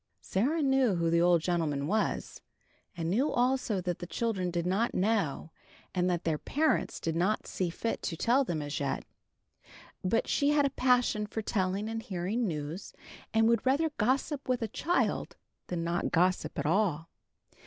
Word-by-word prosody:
Sarah 285 - 0
knew 265 -6 +3
who 170 -1 +1
the 170 0 +4
old 175 -1 +4
gentleman 160 -5 0
was, 210 +7 -1 0.6
and 165 -1 -2
knew 260 +10 +2
also 245 -4 +1
that 175 -1 -3
the 175 - -6
children 195 -4 -1
did 175 -1 -2
not 195 +6 0
know, 185 -6 0 0.4
and 180 0 +1
that 175 -2 -1
their 155 -2 0
parents 310 +2 0
did 165 -1 -2
not 190 +6 +1
see 185 -2 -2
fit 225 +7 -3
to 165 - -3
tell 250 - +3
them 160 - -2
as 145 0 -3
yet. 140 -2 -2 1.0
But 190 +5 +1
she 285 - +2
had 295 -1 +4
a 275 - +1
passion 250 -4 +2
for 220 +1 -4
telling 195 +1 -1
and 225 0 -3
hearing 205 +4 -2
news, 155 +2 -5 0.4
and 225 0 +4
would 230 -1 +3
rather 290 +5 +2
gossip 265 +5 0
with 250 -2 +1
a - - -1
child 345 - 0 0.3
than 175 -2 -2
not 170 +1 -1
gossip 180 +2 +1
at 145 - -2
all. 165 -2 +1
195 Hz, 175 wpm, -30 LUFS, 170-240 Hz, 1.0 s, the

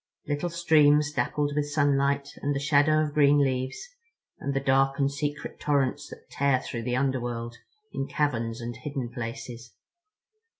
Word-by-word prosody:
Little 145 +4 -1
streams 150 -3 +4
dappled 145 -1 -1
with 145 -1 0
sunlight 140 -1 +1
and 145 0 -1
the - - 0
shadow 150 +2 +3
of 150 -1 -3
green 145 -1 +5
leaves, 130 - -1 0.5
and 140 0 -3
the - - +2
dark 135 0 +2
and 140 0 +1
secret 145 +1 -4
torrents 140 -3 0
that - - -12
tear 140 -2 +2
through 115 -3 -6
the 125 - 0
underworld 120 -3 -2 0.4
in 135 - -3
caverns 115 -5 -1
and 120 0 -5
hidden 140 -5 -4
places. 115 -1 -7
140 Hz, 155 wpm, -27 LUFS, 125-145 Hz, 0.5 s, green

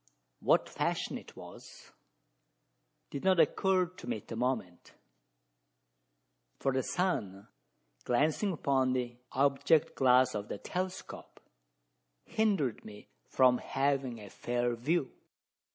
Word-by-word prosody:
What - - +3
fashion - - -2
it - - -16
was, - - -13 1.2
did 140 - -5
not 190 -2 +4
occur 185 +4 +3
to 180 +2 -12
me 245 - -1
at - - -15
the - - -4
moment; 110 -8 -3 1.6
for 135 - 0
the 130 - +1
sun, 115 - -2 0.6
glancing 155 - +1
upon 135 -5 +1
the 120 -2 -3 0.2
object 140 +3 +3
glass 125 -1 +4
of 105 0 -4
the - - -5
telescope, 185 +1 -6 0.9
hindered 195 - 0
me 105 -1 -12 0.2
from 125 -1 +4
having 135 -3 -1
a 100 -2 -11
fair 120 0 -1
view. 140 +4 0
135 Hz, 115 wpm, -31 LUFS, 120-165 Hz, 1.6 s, not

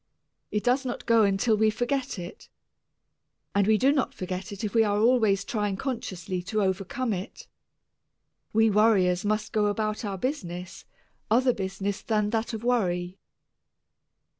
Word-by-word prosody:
It 210 - -2
does 255 +3 +2
not 245 -2 -5
go 230 -1 +5
until 200 +2 +3
we 215 +1 +3
forget 245 +3 -2
it, 175 -1 -9 1.0
and 200 0 +2
we 220 0 +5
do 265 +5 +4
not 280 -3 0
forget 185 +1 -5
it 200 +2 -7
if 210 - -2
we 225 -1 +5
are 205 -1 +1
always 215 -3 +3
trying 205 -4 -1
consciously 185 -8 -4
to 205 +3 -1
overcome 195 +6 -1
it. 190 +4 -6 1.1
We 220 0 +4
worriers 195 -4 +3
must 215 +1 -1
go 210 -1 +2
about 215 +2 -1
our 200 -2 -3
business 180 - -5 0.4
other 250 +3 +4
business 195 0 -3
than 210 -2 0
that 225 +1 -1
of 225 -1 -5
worry. 185 -7 0
210 Hz, 150 wpm, -27 LUFS, 195-230 Hz, 1.1 s, go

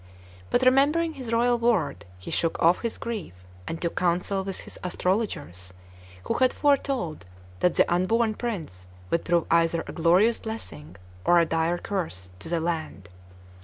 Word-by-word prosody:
But, 250 - +2
remembering 290 +6 +4
his 255 -5 -7
royal 240 +1 +3
word, 230 - +1
he 90 - -8
shook 165 - 0
off 170 +2 +4
his 230 -2 -2
grief 180 - -6 0.2
and 165 - -4
took 170 - -2
counsel 180 +2 0
with 195 -1 -5
his - - -10
astrologers, 175 - -2 0.5
who - - -1
had 255 0 +4
foretold 265 - 0 0.3
that 180 - +2
the - - +5
unborn 220 +5 +2
prince 165 - -5 0.2
would 170 - +1
prove 170 -1 +2
either 165 0 +3
a - - -7
glorious 180 +7 +3
blessing 85 - -8 0.3
or 175 - +5
a 170 - +4
dire 165 +2 0
curse 160 - -4
to 160 - -8
the 170 0 0
land. 160 - -3
175 Hz, 160 wpm, -26 LUFS, 165-230 Hz, 0.5 s, the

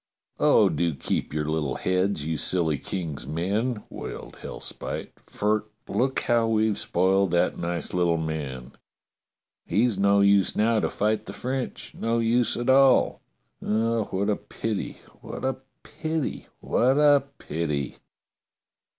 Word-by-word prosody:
*' - - -44
Oh, - - +6
do 85 -3 0
keep - - -2
your 75 0 -1
little 75 -4 -1
heads, 95 -2 0
you 80 0 -1
silly 80 -2 +1
King's 80 -9 -4
men! 105 - -1
'* - - -38
wailed - - -7
Hellspite, - - -5
*'for 105 +1 -1 0.2
look 130 +2 0
how 115 -1 +2
we've 110 -2 +1
spoiled 95 +2 +2
that 85 0 +1
nice 85 -2 -3
little 85 -2 +2
man. 70 -5 -4 1.0
He's 105 +2 +2
no 100 0 +4
use 100 -1 +4
now 110 +1 +3
to - - 0
fight 105 +1 -1
the - - -6
French, 130 0 -4
no 115 +1 -1
use 115 0 +2
at 120 - -3
all. 135 0 +5 0.4
Oh, 115 +1 +1
what 100 +1 -2
a 105 - 0
pity, 110 -3 -4 0.2
w^hat - - -7
a 130 -1 -1 0.5
pity, 160 -2 -2
what 130 +3 +2
a 145 -2 +5
pity 75 -3 -3
100 Hz, 140 wpm, -26 LUFS, 85-115 Hz, 1.0 s, Oh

